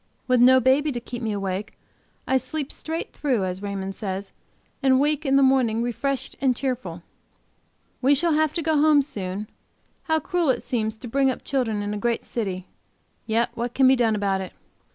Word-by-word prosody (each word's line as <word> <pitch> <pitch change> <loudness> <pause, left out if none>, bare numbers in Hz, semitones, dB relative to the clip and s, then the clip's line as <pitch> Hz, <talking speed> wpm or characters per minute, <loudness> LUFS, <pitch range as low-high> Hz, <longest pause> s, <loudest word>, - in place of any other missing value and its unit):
With 250 -2 +4
no 260 +1 +7
baby 270 +4 +3
to 240 - -3
keep 240 +1 -7
me 225 -2 -1
awake, 200 +1 -4 0.5
I 265 - +2
sleep 295 +1 -4
straight 325 +1 -5
through, 250 -10 0
as 185 +1 -4
Raymond 195 -1 -4
says, 195 -1 -5 0.5
and 265 -2 +4
wake 295 +1 +1
in 270 - +3
the 275 - +5
morning 250 -4 +3
refreshed 245 +3 -2
and 260 -2 +3
cheerful. 235 -11 -4 1.0
We 275 +2 +5
shall 330 +3 +2
have 310 -1 +2
to 335 - -2
go 310 -2 +2
home 300 -2 +5
soon; 200 -5 -5 0.6
how 320 -1 +2
cruel 350 -2 0
it 260 - +1
seems 220 -3 -2
to 240 - -9
bring 270 +3 +2
up 255 - -4
children 225 -6 -1
in 205 0 -3
a 210 - -3
great 235 +2 0
city! 190 -6 -4 0.6
Yet 230 +1 +1
what 240 +1 -4
can 265 -1 +5
be 265 - +6
done 230 -3 +2
about 195 -2 0
it? 190 - -7
245 Hz, 195 wpm, -24 LUFS, 210-275 Hz, 1.0 s, no